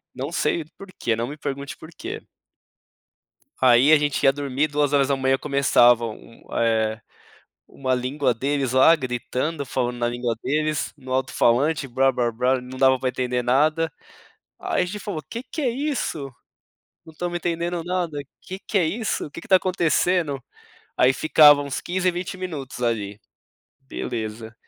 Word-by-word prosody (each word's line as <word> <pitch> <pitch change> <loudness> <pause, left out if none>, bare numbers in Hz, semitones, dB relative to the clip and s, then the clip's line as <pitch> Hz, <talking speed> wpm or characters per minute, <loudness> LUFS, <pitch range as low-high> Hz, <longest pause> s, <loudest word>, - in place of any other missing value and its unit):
Não 135 +4 -4
sei 170 -1 0
por 195 - -10
quê, 115 - +1
não 115 +2 -2
me 145 - -7
pergunte 140 -1 -5
por 160 - -12
quê. 400 +6 -6 1.4
Aí, 130 +3 +6
a 155 - +8
gente 145 -1 -1
ia 135 -1 +6
dormir, 140 +1 -1
2h 140 -2 +1
começavam 120 -5 +3
um 115 - -17
eh, 110 -1 +1 0.7
uma 130 -1 -2
língua 130 +1 0
deles 135 +2 -1
lá 130 +6 +7
gritando, 135 +2 -3
falando 125 -2 -2
na 120 - +1
língua 120 -1 -2
deles 155 +2 -1
no 130 -2 -7
alto-falante 130 +3 +1
blá-blá-blá, 125 0 +1
não 125 +1 -9
dava 130 0 +4
pra 130 - 0
entender 125 0 -1
nada. 155 +6 +2 0.7
Aí - - 0
a - - +1
gente 200 +4 -5
falou: 195 -7 -4
"Que 235 - -5
que 260 +5 -7
é 265 - +2
isso? 260 - -2 0.8
Não 160 - -13
estamos 175 +2 -3
entendendo 170 0 -2
nada, 175 -4 -2 0.2
que 190 +1 -8
que 205 - -2
é 180 - +3
isso? 215 +5 -2
O - - -17
que 170 - -8
que - - -14
tá 190 - +6
acontecendo?". 175 -4 +1 0.6
Aí, 130 - +5
ficava 150 0 +6
uns 140 -1 -4
15, 185 +1 -1
20 180 +2 -5
minutos 155 -9 -6
ali. 105 -3 -2 0.6
Beleza, 110 -4 -6
140 Hz, 155 wpm, -23 LUFS, 125-165 Hz, 1.4 s, a